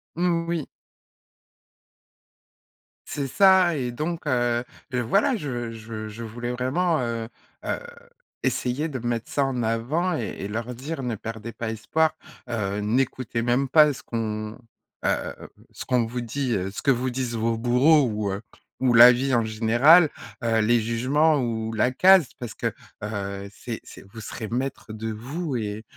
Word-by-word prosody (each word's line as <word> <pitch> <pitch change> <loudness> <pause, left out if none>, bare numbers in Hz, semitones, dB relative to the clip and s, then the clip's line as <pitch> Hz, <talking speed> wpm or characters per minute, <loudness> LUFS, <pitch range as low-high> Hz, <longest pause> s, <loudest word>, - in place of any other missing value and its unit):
Mmh, 170 -1 +1
oui. 165 -4 -1 2.4
C'est 140 -2 -3
ça 185 +1 +5
et 125 -3 -2
donc, 160 +5 -4
heu, 120 -2 +1 0.3
heu, 125 - +1
voilà, 200 - +2
je 120 - -4
je 110 -1 -7
je 115 +2 -8
voulais 120 +2 -5
vraiment, 150 +7 0
heu, 115 -1 -3 0.4
heu, - - -1 0.6
essayer 130 +6 0
de 135 -5 -5
mettre 120 -1 -3
ça 140 -1 +2
en 125 -3 -1
avant 145 +11 0
et 110 - -4
et 100 - -4
leur 115 +4 -4
dire: 135 +2 -5
«Ne 120 -2 -2
perdez 115 +2 -6
pas 115 -1 -5
espoir, 155 +8 +1 0.4
heu, 105 -3 -2
n'écoutez 120 +1 0
même 125 +3 +1
pas 150 +1 +6
ce 135 - -11
qu'on, 110 -1 -4 0.5
heu, - - 0 0.4
ce - - -8
qu'on 125 -2 +2
vous 120 +2 -4
dit, 125 +1 -2
heu, 95 0 -2
ce - - -6
que 140 - +3
vous 130 +1 0
disent 125 -2 -3
vos 115 0 0
bourreaux 130 +5 +4
ou, 105 -2 -2
heu, 100 +2 -4 0.4
ou 125 -2 +3
la 120 +2 +10
vie 130 +2 0
en 115 -1 +3
général, 120 +10 +5 0.3
heu, 115 -1 +2
les 120 +2 +3
jugements 135 +8 +2
ou 110 -2 -2
la 115 +3 +2
case, 185 0 +6
parce 120 -3 -6
que, - - -2 0.3
heu, 100 -1 -4
c'est 115 +3 -6
c'est - - -12
vous 110 - -8
serez 110 +1 -6
maître 125 -2 -3
de 110 +1 -4
vous 135 +7 -4
et 105 0 -4
120 Hz, 165 wpm, -25 LUFS, 110-140 Hz, 2.4 s, la